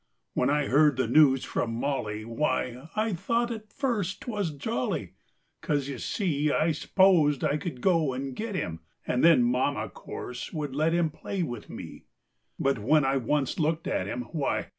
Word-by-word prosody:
When 125 Hz, -, +1 dB
I 145 Hz, 0 st, +2 dB
heard 145 Hz, 0 st, +4 dB
the 130 Hz, -, +2 dB
news 135 Hz, -4 st, +5 dB
from 115 Hz, -1 st, -2 dB
Molly, 110 Hz, -5 st, -2 dB
Why, 130 Hz, +2 st, -2 dB
I 215 Hz, 0 st, 0 dB
thought 235 Hz, +7 st, 0 dB
at 215 Hz, -2 st, -7 dB
first 210 Hz, -, -2 dB
't 245 Hz, -, -4 dB
was 205 Hz, -5 st, -1 dB
jolly, 155 Hz, -, -3 dB, 0.5 s
'Cause, 145 Hz, -3 st, 0 dB
you 140 Hz, -, -5 dB
see, 150 Hz, -7 st, 0 dB
I 160 Hz, +3 st, +2 dB
s'posed 160 Hz, -3 st, +3 dB
I 145 Hz, -, +2 dB
could 150 Hz, -5 st, -6 dB
go 165 Hz, -7 st, +3 dB
and 130 Hz, 0 st, -4 dB
get 215 Hz, -, -4 dB
him 80 Hz, -, -3 dB, 0.3 s
And 125 Hz, -, 0 dB
then 165 Hz, -7 st, +7 dB
Mama, 125 Hz, +4 st, 0 dB
course, 125 Hz, 0 st, -7 dB
would 145 Hz, -4 st, -3 dB
let 155 Hz, +3 st, +2 dB
him 170 Hz, -2 st, +2 dB
Play 185 Hz, +4 st, -3 dB
with 120 Hz, -8 st, -6 dB
me. -, -, -9 dB, 0.5 s
But 135 Hz, -3 st, +1 dB
when 140 Hz, +7 st, +3 dB
I 135 Hz, -, +2 dB
had 135 Hz, -4 st, -1 dB
once 145 Hz, -1 st, 0 dB
looked 160 Hz, +1 st, 0 dB
at 95 Hz, -, -1 dB
him, 125 Hz, +4 st, -3 dB
"Why!" 150 Hz, -5 st, -1 dB
150 Hz, 185 wpm, -28 LUFS, 130-175 Hz, 0.5 s, then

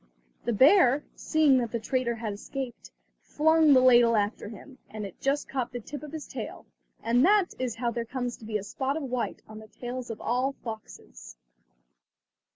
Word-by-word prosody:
The 235 Hz, -, 0 dB
bear, 275 Hz, -, +5 dB
seeing 300 Hz, -5 st, +3 dB
that 235 Hz, -2 st, -2 dB
the 235 Hz, -, -2 dB
traitor 235 Hz, +1 st, -1 dB
had 220 Hz, -2 st, -4 dB
escaped, 240 Hz, -, -7 dB, 0.3 s
flung 315 Hz, -, +3 dB
the 255 Hz, -, +6 dB
ladle 240 Hz, -2 st, +6 dB
after 205 Hz, 0 st, -1 dB
him, 255 Hz, +5 st, -12 dB
and 215 Hz, -1 st, -6 dB
it 195 Hz, -, -11 dB
just 280 Hz, +2 st, 0 dB
caught 255 Hz, -3 st, -3 dB
the 245 Hz, -, -3 dB
tip 290 Hz, +6 st, -8 dB
of 300 Hz, -1 st, -9 dB
his 315 Hz, -2 st, -7 dB
tail, -, -, -7 dB, 0.4 s
and 240 Hz, +2 st, +3 dB
that 400 Hz, 0 st, +4 dB
is 250 Hz, -3 st, -2 dB
how 235 Hz, 0 st, -1 dB
there 235 Hz, 0 st, -3 dB
comes 245 Hz, 0 st, -4 dB
to 225 Hz, -, -13 dB
be 215 Hz, -1 st, -1 dB
a 200 Hz, -, -6 dB
spot 265 Hz, +8 st, -2 dB
of 315 Hz, -, -4 dB
white 250 Hz, -2 st, -3 dB
on 215 Hz, 0 st, -10 dB
the 220 Hz, -, -12 dB
tails 245 Hz, +2 st, -7 dB
of 225 Hz, -, -6 dB
all 255 Hz, +4 st, 0 dB
foxes. 220 Hz, -, -9 dB
245 Hz, 190 wpm, -27 LUFS, 225-275 Hz, 0.4 s, the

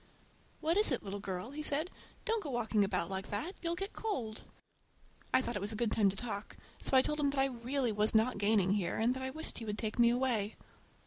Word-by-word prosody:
"What 330 Hz, +4 st, +2 dB
is 420 Hz, -6 st, +8 dB
it, 255 Hz, -, +1 dB
little 200 Hz, 0 st, -4 dB
girl?" 190 Hz, +4 st, -4 dB
he 300 Hz, +2 st, -5 dB
said. 305 Hz, +4 st, 0 dB, 0.3 s
"Don't 455 Hz, -1 st, +1 dB
go 305 Hz, -, -5 dB
walking 225 Hz, -4 st, +1 dB
about 185 Hz, -4 st, 0 dB
like 190 Hz, 0 st, -3 dB
that—you'll 335 Hz, -, -3 dB
get 390 Hz, +3 st, -4 dB
cold." 245 Hz, -, -3 dB, 0.9 s
I 260 Hz, -, +4 dB
thought 240 Hz, -, -3 dB
it 205 Hz, -, -2 dB
was 205 Hz, +2 st, -1 dB
a -, -, -4 dB
good 225 Hz, 0 st, 0 dB
time 205 Hz, -3 st, +4 dB
to 190 Hz, -, -3 dB
talk, 210 Hz, -1 st, -5 dB, 0.2 s
so 265 Hz, -, +3 dB
I 260 Hz, -, +6 dB
told 300 Hz, 0 st, -1 dB
him 285 Hz, -1 st, +3 dB
that 280 Hz, -1 st, -1 dB
I 270 Hz, -, +5 dB
really 255 Hz, 0 st, -1 dB
was 210 Hz, +1 st, +1 dB
not 220 Hz, 0 st, +3 dB
gaining 205 Hz, -2 st, +3 dB
here, 195 Hz, -4 st, 0 dB
and 230 Hz, +3 st, +2 dB
that 260 Hz, -, -5 dB
I 260 Hz, -, -2 dB
wished 315 Hz, +4 st, -6 dB
he 230 Hz, -, -6 dB
would 210 Hz, -1 st, -3 dB
take 220 Hz, +1 st, -3 dB
me 235 Hz, 0 st, +7 dB
away. 235 Hz, -4 st, 0 dB
235 Hz, 240 wpm, -33 LUFS, 205-280 Hz, 0.9 s, is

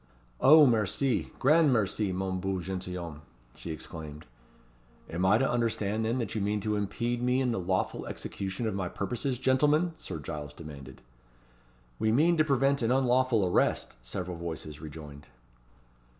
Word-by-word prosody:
"Oh! 150 Hz, +2 st, +8 dB
merci! 115 Hz, +2 st, +1 dB
grand 150 Hz, +2 st, +4 dB
merci, 105 Hz, -3 st, +1 dB
mon 95 Hz, 0 st, -2 dB
beau 95 Hz, 0 st, -2 dB
gentilhomme!" 90 Hz, -3 st, -5 dB, 0.3 s
she -, -, -9 dB
exclaimed. 80 Hz, -1 st, -7 dB, 0.9 s
"Am 85 Hz, +3 st, -2 dB
I 105 Hz, -, +5 dB
to 135 Hz, +3 st, +2 dB
understand 110 Hz, -2 st, 0 dB
then, 115 Hz, +3 st, 0 dB
that 115 Hz, -4 st, -3 dB
you 110 Hz, -, -2 dB
mean 105 Hz, +1 st, 0 dB
to 105 Hz, +1 st, -1 dB
impede 120 Hz, +4 st, -2 dB
me 125 Hz, +1 st, +2 dB
in 130 Hz, -2 st, +1 dB
the 115 Hz, -, -1 dB
lawful 95 Hz, +1 st, -1 dB
execution 95 Hz, +4 st, -4 dB
of 110 Hz, -, -1 dB
my 95 Hz, -2 st, -2 dB
purposes, 125 Hz, -, -2 dB
gentlemen?" 150 Hz, +7 st, +2 dB
Sir 90 Hz, -, -6 dB
Giles 75 Hz, -1 st, -6 dB
demanded. 70 Hz, -5 st, -11 dB, 1.0 s
"We 110 Hz, -, +2 dB
mean 160 Hz, +9 st, +4 dB
to 155 Hz, -, +5 dB
prevent 140 Hz, -1 st, +2 dB
an 115 Hz, -, +1 dB
unlawful 130 Hz, -4 st, +3 dB
arrest," 90 Hz, -, +1 dB
several 85 Hz, +9 st, -5 dB
voices 80 Hz, -3 st, -6 dB
rejoined. 75 Hz, -2 st, -10 dB
105 Hz, 150 wpm, -29 LUFS, 90-125 Hz, 1.0 s, Oh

